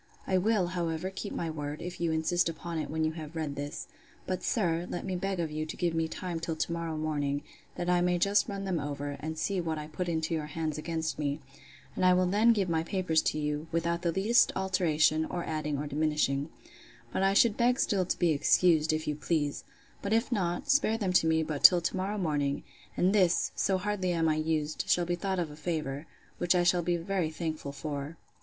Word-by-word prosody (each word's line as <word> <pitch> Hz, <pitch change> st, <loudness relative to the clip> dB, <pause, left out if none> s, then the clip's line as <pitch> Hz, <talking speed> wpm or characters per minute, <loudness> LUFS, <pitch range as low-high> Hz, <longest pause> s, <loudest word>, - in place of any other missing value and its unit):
—I 190 Hz, -, 0 dB
will, 200 Hz, -2 st, +2 dB
however, 170 Hz, +1 st, -2 dB
keep 195 Hz, +2 st, -6 dB
my 165 Hz, -1 st, -3 dB
word, 150 Hz, -1 st, -5 dB
if 175 Hz, +1 st, -7 dB
you 170 Hz, -1 st, +1 dB
insist 165 Hz, +2 st, +1 dB
upon 165 Hz, 0 st, -5 dB
it -, -, -4 dB
when 160 Hz, +1 st, -1 dB
you 155 Hz, -, +1 dB
have 160 Hz, 0 st, -8 dB
read 155 Hz, -3 st, -3 dB
this; 145 Hz, +1 st, -5 dB, 0.4 s
but, 185 Hz, -1 st, -2 dB
sir, 175 Hz, -5 st, 0 dB
let 175 Hz, -, -4 dB
me 190 Hz, -, -2 dB
beg 195 Hz, +1 st, -2 dB
of 165 Hz, -2 st, -1 dB
you 155 Hz, +1 st, -2 dB
to -, -, -6 dB
give 175 Hz, -2 st, 0 dB
me 165 Hz, 0 st, 0 dB
time 175 Hz, 0 st, -4 dB
till 165 Hz, 0 st, -3 dB
to 155 Hz, +2 st, -2 dB
morrow 165 Hz, -2 st, -3 dB
morning, 145 Hz, -2 st, -1 dB, 0.3 s
that 175 Hz, -, -3 dB
I 180 Hz, 0 st, +3 dB
may 180 Hz, 0 st, +2 dB
just 200 Hz, +5 st, +2 dB
run 200 Hz, -1 st, -4 dB
them 185 Hz, -4 st, 0 dB
over, 145 Hz, 0 st, -4 dB
and 160 Hz, +1 st, -5 dB
see 190 Hz, +3 st, 0 dB
what 160 Hz, -2 st, -2 dB
I 150 Hz, -, -5 dB
put 165 Hz, +4 st, -4 dB
into 160 Hz, 0 st, -1 dB
your 155 Hz, -2 st, -2 dB
hands 155 Hz, 0 st, -3 dB
against 160 Hz, 0 st, -3 dB
me: 145 Hz, 0 st, -1 dB, 0.6 s
and -, -, -1 dB
I 185 Hz, 0 st, +6 dB
will 185 Hz, 0 st, +3 dB
then 210 Hz, +6 st, +4 dB
give 205 Hz, -5 st, +1 dB
my 165 Hz, -2 st, +1 dB
papers 170 Hz, -2 st, +1 dB
to -, -, -1 dB
you, 150 Hz, +1 st, -2 dB
without 170 Hz, +1 st, 0 dB
the 170 Hz, -, +1 dB
least 210 Hz, +8 st, +4 dB
alteration, 160 Hz, -5 st, +2 dB
or 175 Hz, +1 st, -4 dB
adding 155 Hz, -2 st, -2 dB
or 145 Hz, -, -3 dB
diminishing: 150 Hz, -1 st, 0 dB, 0.6 s
But -, -, 0 dB
I 195 Hz, 0 st, +3 dB
should 215 Hz, +1 st, +5 dB
beg 245 Hz, +2 st, +2 dB
still 195 Hz, -3 st, +2 dB
to -, -, -1 dB
be 175 Hz, -2 st, +3 dB
excused, 160 Hz, +1 st, +4 dB
if 155 Hz, 0 st, -2 dB
you 150 Hz, -, +1 dB
please: 150 Hz, -1 st, -1 dB, 0.4 s
But 200 Hz, -, -1 dB
if 230 Hz, +3 st, +1 dB
not, 180 Hz, -1 st, -1 dB
spare 275 Hz, -6 st, +3 dB
them 195 Hz, -5 st, -1 dB
to 165 Hz, -, +4 dB
me 160 Hz, 0 st, +3 dB
but 155 Hz, -2 st, -4 dB
till 180 Hz, -, +9 dB
to 170 Hz, -, -2 dB
morrow 195 Hz, +3 st, -2 dB
morning: 145 Hz, -6 st, -1 dB, 0.3 s
and 185 Hz, +2 st, +3 dB
this, 180 Hz, -5 st, +3 dB
so 190 Hz, -1 st, +1 dB
hardly 185 Hz, -2 st, -1 dB
am 165 Hz, -1 st, +1 dB
I 155 Hz, -1 st, +2 dB
used, 155 Hz, -1 st, -1 dB
shall 175 Hz, -, +3 dB
be 175 Hz, -, -1 dB
thought 190 Hz, +2 st, -2 dB
a 175 Hz, -, +1 dB
favour, 150 Hz, -2 st, -3 dB, 0.3 s
which 175 Hz, +1 st, +2 dB
I 175 Hz, -, +3 dB
shall 175 Hz, 0 st, +3 dB
be 175 Hz, +1 st, 0 dB
very 175 Hz, -1 st, -1 dB
thankful 155 Hz, -3 st, -4 dB
for. 145 Hz, +2 st, -5 dB
165 Hz, 225 wpm, -30 LUFS, 155-185 Hz, 0.6 s, till